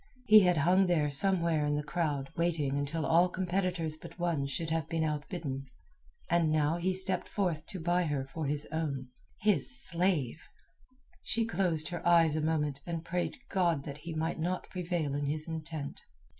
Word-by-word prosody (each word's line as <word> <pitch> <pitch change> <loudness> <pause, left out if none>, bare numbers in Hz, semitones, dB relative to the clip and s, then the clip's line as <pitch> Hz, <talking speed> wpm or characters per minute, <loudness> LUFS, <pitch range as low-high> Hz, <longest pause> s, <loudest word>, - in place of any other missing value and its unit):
He 215 -2 +9
had 180 -4 +3
hung 180 +5 +4
there 155 -5 +2
somewhere 170 -1 +2
in 145 0 +1
the 150 - -1
crowd 150 -3 -2
waiting 165 -5 0
until 145 +3 -1
all 170 +4 +4
competitors 180 -3 -1
but - - -11
one 170 -6 0
should 160 +3 -3
have 160 -1 -1
been 165 -1 0
outbidden, 150 -3 -3 0.6
and 170 -2 +2
now 155 +1 +2
he 180 +2 0
stepped 185 0 +1
forth 170 -7 -1
to 190 - -6
buy 175 +2 +1
her 145 -4 -1
for 150 +2 -4
his 145 +1 -1
own—his 160 - -1
slave! 170 - 0 0.8
She 230 0 0
closed 175 -8 0
her 175 -1 -4
eyes 165 -3 +5
a 155 - 0
moment 150 -3 0
and 165 -1 -4
prayed 175 +1 -2
God 170 -6 +1
that 140 0 -7
he 165 +1 -6
might 160 +1 -1
not 180 +3 -2
prevail 175 -5 -2
in 145 0 -1
his 155 +2 -2
intent. 160 -3 -5
165 Hz, 170 wpm, -31 LUFS, 150-175 Hz, 0.8 s, He